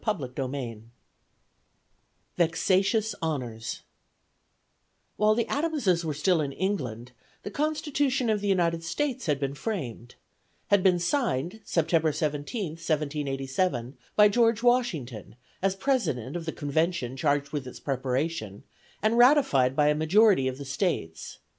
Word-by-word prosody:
CHAPTER 155 - -2
XI 130 -5 -4 1.5
VEXATIOUS 195 +6 +2
HONORS 125 -8 -4 1.3
WHILE 215 0 +4
the 235 0 0
Adamses 275 - 0
were 155 -3 -2
still 165 +2 +2
in 140 -2 -2
England, 125 - -3 0.3
the 205 - -6
Constitution 290 -3 0
of 215 -2 +1
the 205 - -2
United 170 -4 +1
States 260 - -2
had 145 -2 +1
been 140 -1 -2
framed; 135 - -5 0.5
had 200 -1 +4
been 185 -2 +4
signed, 180 - -1
September 165 -1 +1
17th, 155 - -3
1787, 140 -3 -1 0.2
by 210 0 +7
George 230 +1 +2
Washington, 160 - 0 0.3
as 195 0 +1
president 175 - -1
of 170 -2 -4
the - - 0
convention 150 -3 -1
charged 145 +1 0
with 145 -4 -4
its 125 - -9
preparation, 130 -4 -2 0.4
and 225 +2 +3
ratified 240 - +5
by 150 0 +4
a - - +4
majority 160 0 +4
of 130 0 -3
the 140 - -7
States. 135 - -3
165 Hz, 130 wpm, -27 LUFS, 135-210 Hz, 1.5 s, by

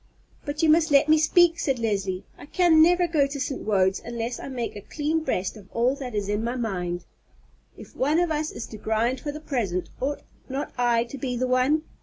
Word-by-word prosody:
"But 290 +1 -3
you 320 - +4
must 320 +1 +4
let 285 +1 +5
me 310 0 +5
speak," 335 +2 +4
said 270 -3 0
Leslie. 195 -5 -1
"I - - -13
can 335 -1 +4
never 350 +2 +5
go 300 -4 +2
to 280 0 -6
St. 270 0 -3
Wode's 190 -2 +1
unless 235 +1 -4
I - - -7
make 245 -5 -4
a 205 - -7
clean 305 +8 -1
breast 255 -11 -2
of 205 -3 -13
all 240 +3 +2
that 250 -5 -6
is 205 -1 -1
in 205 +2 -1
my 240 +2 -2
mind. 180 -7 -3 0.7
If - - -13
one 295 +4 +1
of 350 -2 +1
us 305 0 -1
is - - -6
to 215 - -8
grind 225 +4 0
for 290 - -4
the 300 - -7
present, 220 - -2
ought 285 +2 -2 0.3
not 270 +2 -4
I 240 -2 +2
to 250 +3 -9
be 250 -1 -2
the 255 - 0
one? 255 +5 +2
255 Hz, 225 wpm, -25 LUFS, 225-305 Hz, 0.7 s, let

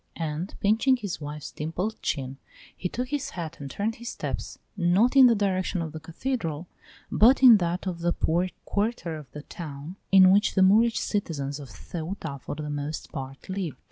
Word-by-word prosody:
And, 160 +3 -4
pinching 225 +6 +3
his 205 -9 -5
wife's 150 0 -6
dimpled 180 +8 -4
chin, 135 -2 -2 0.4
he 180 - -3
took 250 +5 -4
his 290 0 -2
hat 170 -1 -5
and 140 -1 -6
turned 215 +8 -2
his 235 +1 -6
steps - - -5 0.2
not 195 +7 +3
in 265 -2 +9
the 235 - +4
direction 190 -2 0
of 160 -2 -3
the 160 - -7
cathedral, 165 - -3 0.5
but 255 +5 +5
in 240 -4 +10
that 175 0 -2
of 180 -3 -3
the 175 +1 +1
poor 175 +2 0 0.2
quarter 205 -5 -1
of 150 -4 -10
the 150 - -8
town 155 +2 -8
in 190 -1 +8
which 205 +2 +3
the 190 - +5
Moorish 220 +4 +5
citizens 145 -8 -2
of 140 -3 -9
Ceuta 160 - -6
for 130 - -6
the 150 0 -5
most 145 +1 -4
part 135 -1 -7
live. 185 -7 -3
175 Hz, 185 wpm, -26 LUFS, 150-205 Hz, 0.5 s, in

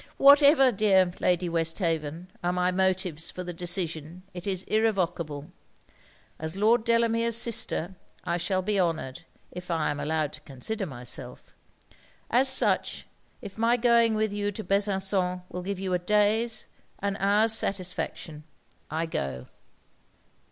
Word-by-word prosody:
'Whatever, 280 -1 +7
dear 195 -4 +3
Lady 180 0 +1
Westhaven, 165 0 -2
are 175 - +1
my 180 0 +1
motives 185 -3 0
for 180 - -7
the 175 0 -6
decision, 170 -1 -4
it 180 +2 -7
is 190 -2 -1
irrevocable; 175 -9 -1 0.9
as 160 +2 -4
Lord 220 +3 +3
Delamere's 230 0 +2
sister, 220 -6 +1 0.3
I 170 -1 -1
shall 185 +2 -1
be 205 +1 0
honoured, 165 -3 -2 0.3
if 180 0 -9
I 160 -3 0
am 145 - -5
allowed 150 0 -1
to - - -11
consider 190 - -5
myself. 125 -4 -8 0.8
As 260 +3 +5
such, 260 - +2 0.4
if 205 +1 -9
my 235 +2 +3
going 235 -2 +3
with 215 -1 0
you 205 0 -2
to 220 - -6
Besançon 190 -2 0
will 180 - -6
give 195 +2 -4
you 190 -1 -2
a 180 - +1
day's 210 +4 +1 0.3
an 200 0 -2
hour's 210 +3 +3
satisfaction, 180 -6 -3 0.5
I 160 +1 -2
go.' 65 - -4
185 Hz, 135 wpm, -27 LUFS, 165-215 Hz, 0.9 s, Whatever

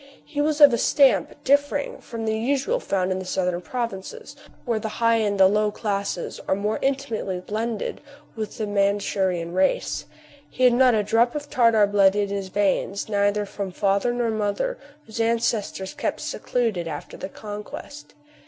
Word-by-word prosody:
He 290 -1 -3
was 300 0 +1
of 290 -4 +9
a 235 - +1
stamp 275 -3 +3
differing 285 +1 +1
from 225 -1 -6
that 220 - 0
usually 275 - 0
found 190 - -1
in 185 - -1
the - - -5
southern 180 -1 -1
provinces, 235 - -5 0.3
where 235 -3 0
the 220 - -4
high 230 0 +3
and 205 -3 0
low 210 +3 +4
classes 200 -4 -3
are - - +2
more 210 +2 -1
intimately 260 -9 -1
blended 220 +3 -3 0.3
with 220 -2 -5
the 220 - -2
Mandshurian 195 -4 0
race: 190 +1 0 0.4
he 255 - -3
had 250 -1 +6
not 250 -1 +5
a 210 - +2
drop 230 +5 +2
of 290 -1 -5
Tartar 230 -5 +4
blood 200 -1 +4
in 205 -1 0
his 200 -1 -3
veins, 200 +1 0
neither 205 0 +1
from 200 -1 -5
father 200 +5 +1
nor 240 -1 0
mother, 220 - -1 0.3
whose 225 +1 -4
ancestors 225 -4 -1
kept - - -3
secluded 220 -9 -2
after 150 -2 -7
the 190 - -6
conquest. 210 +9 -9
215 Hz, 165 wpm, -24 LUFS, 195-240 Hz, 0.4 s, of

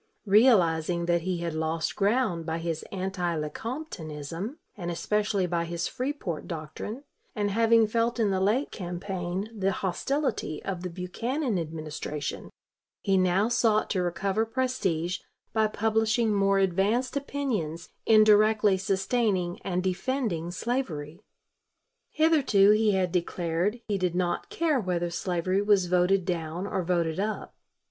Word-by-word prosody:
Realizing 180 -6 +4
that 170 0 +2
he 180 0 -2
had 170 -2 -2
lost 160 +1 -1
ground 205 -4 +1
by 160 0 -2
his 165 -1 -3
anti 185 -3 -2
Lecomptonism, 165 - -5 0.2
and 175 -4 -5
especially 205 +2 0
by 170 -1 -1
his 170 0 -2
Freeport 255 - -4
doctrine, 170 - -6 0.3
and 205 -2 0
having 225 +1 +4
felt 230 +2 0
in 215 -3 +2
the 190 - +1
late 215 +9 +1
campaign 180 +1 -4
the 195 -2 +1
hostility 195 - -1
of 185 -3 -3
the 180 - -4
Buchanan 220 - -2
Administration, 155 -2 -5 0.5
he 195 - +2
now 185 +3 +3
sought 230 -3 +2
to 185 - +1
recover 195 +4 0
prestige 225 -8 -1 0.3
by 220 -1 +3
publishing 220 +1 +1
more 195 -1 +3
advanced 195 +8 +1
opinions 235 - -3 0.2
indirectly 215 -2 +5
sustaining 190 -2 0
and 180 -1 -2
defending 190 -3 -1
slavery. 175 - -3 0.9
Hitherto 280 -11 +4
he 215 0 +3
had 185 -2 +1
declared 175 +5 -1
he 205 -2 0
did 180 -2 0
not 180 - -1
care 335 -9 +1
whether 175 -4 -1
slavery 180 +2 0
was 205 -3 +3
voted 180 +1 +2
down 170 0 -3
or 190 - -1
voted 170 -2 0
up. 215 +2 -3
190 Hz, 130 wpm, -27 LUFS, 175-220 Hz, 0.9 s, indirectly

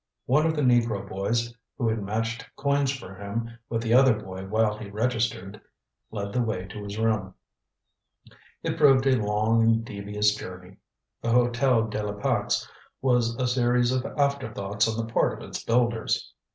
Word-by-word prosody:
One 150 +5 +3
of 160 - 0
the 150 - 0
negro 120 -5 +2
boys 115 +5 -1 0.2
who 120 - 0
had 110 -1 0
matched 115 +3 -3
coins 140 -1 +1
for 130 -8 -8
him 115 +4 -5
with 115 0 -1
the 115 0 +1
other 130 -1 +6
boy 95 0 -8
while 110 +1 +1
he 105 -1 -8
registered 115 -1 -2 0.5
led 100 -2 -5
the 125 - +1
way 110 -6 -2
to 105 +2 -7
his 100 +1 -6
room. 110 -4 0 1.3
It - - -2
proved 135 -2 +6
a 130 -4 +3
long 110 +2 +2
and 115 0 +3
devious 105 0 0
journey. 90 -2 -9 0.4
The 115 - -2
Hotel 120 0 +3
de 105 0 -3
la 105 -1 -3
Pax 100 - 0 0.3
was 125 -3 +2
a 125 +1 0
series 125 0 +2
of 130 -1 0
afterthoughts 110 -8 0
on 110 0 -2
the 115 - -12
part - - +2
of - - -9
its - - -6
builders. 115 -1 0
115 Hz, 170 wpm, -26 LUFS, 105-125 Hz, 1.3 s, other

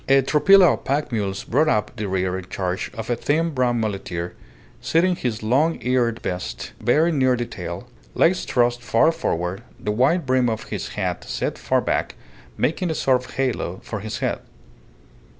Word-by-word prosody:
A 135 0 +6
tropilla 175 +7 +6
of - - -6
pack 140 +2 -1
mules 100 -4 -2
brought 150 +6 +2
up 105 -7 0
the 105 - -3
rear 95 -1 0
in 95 -1 -5
charge 95 +1 -2
of 115 +1 -4
a - - +2
thin 160 +7 0
brown 125 -4 +1
muleteer, 95 -5 -3 0.5
sitting 180 +3 +2
his 120 -7 -3
long 140 +9 +2
eared 120 -2 +1
beast 90 -9 -4
very 155 +7 +3
near 130 -4 +3
the 120 - -2
tail, - - -7 0.3
legs 180 +2 +3
thrust 120 -1 +1
far 120 +7 +3
forward, 90 - -2 0.2
the 105 - -2
wide 135 +10 +2
brim 130 -1 +2
of 110 - -3
his - - -4
hat - - -2
set - - -2
far - - +1
back, - - -1 0.4
making 175 +3 0
a 160 - -1
sort 130 -3 +2
of - - -12
halo 125 -9 -1
for 110 - -5
his 110 +2 -5
head. - - -1
120 Hz, 180 wpm, -22 LUFS, 105-145 Hz, 0.5 s, A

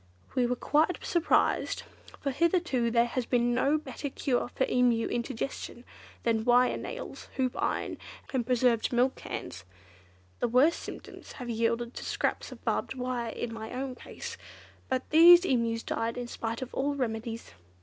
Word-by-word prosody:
We 245 -2 +2
were 250 - 0
quite 310 +7 +2
surprised, 345 0 +2 0.4
for 280 - -1
hitherto 335 -6 +1
there 235 0 +4
has 240 0 -3
been 240 -1 +2
no 275 +5 +3
better 285 -1 -5
cure 255 -2 0
for 260 +1 0
Emu 245 -2 +2
indigestion 240 0 -4 0.4
than 225 -2 +1
wire 245 +1 +4
nails, - - -7
hoop 255 -2 0
iron, - - -2 0.3
and 255 -2 +1
preserved 245 -1 +2
milk 250 +2 +3
cans. - - -6 0.8
The - - +1
worst 260 +8 +4
symptoms - - -9
have 245 -2 -5
yielded 230 +1 0
to - - -7
scraps - - -2
of - - -12
barbed - - -1
wire 250 -2 -2
in 230 +1 -4
my 220 -1 -7
own 260 +1 -3
case. - - -8 0.5
But 260 0 -1
these 345 +3 +9
Emus 230 -5 +1
died 230 +1 -2
in 245 - -3
spite 230 +1 -4
of 255 - -10
all 285 +2 0
remedies." 230 -3 -4
250 Hz, 160 wpm, -29 LUFS, 235-265 Hz, 0.8 s, these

